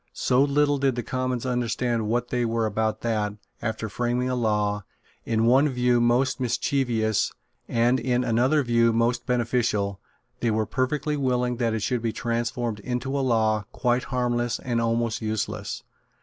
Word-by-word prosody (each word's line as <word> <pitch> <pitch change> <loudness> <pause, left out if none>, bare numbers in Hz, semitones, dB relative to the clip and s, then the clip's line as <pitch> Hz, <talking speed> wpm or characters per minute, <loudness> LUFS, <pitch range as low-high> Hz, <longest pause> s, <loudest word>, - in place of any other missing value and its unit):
So 125 +1 +2
little 145 0 +2
did 135 -2 +1
the 120 - -3
Commons 130 0 -2
understand 120 -2 -1
what 120 +2 0
they 125 -1 0
were 115 -1 0
about 110 +1 -1
that, 105 -3 -1 0.3
after 110 -1 -3
framing 120 +3 -1
a - - 0
law, 105 -3 0 0.4
in 115 0 +1
one 135 +5 +5
view 125 -2 +2
most 125 +3 +2
mischievous, 120 -3 0 0.4
and 120 +2 +2
in 125 +1 0
another 125 +5 +2
view 115 -1 +3
most 120 +2 0
beneficial, 115 -5 0 0.4
they 120 - +1
were 110 0 +1
perfectly 145 +4 -1
willing 125 -3 0
that 115 -2 0
it 110 - -2
should 125 0 0
be 115 -1 -1
transformed 115 -1 -2
into 125 +5 -3
a 140 - +1
law 110 -4 +1
quite 125 0 0
harmless 120 -2 0
and 120 -2 -1
almost 115 0 0
useless. 105 - -3
120 Hz, 160 wpm, -25 LUFS, 110-125 Hz, 0.4 s, one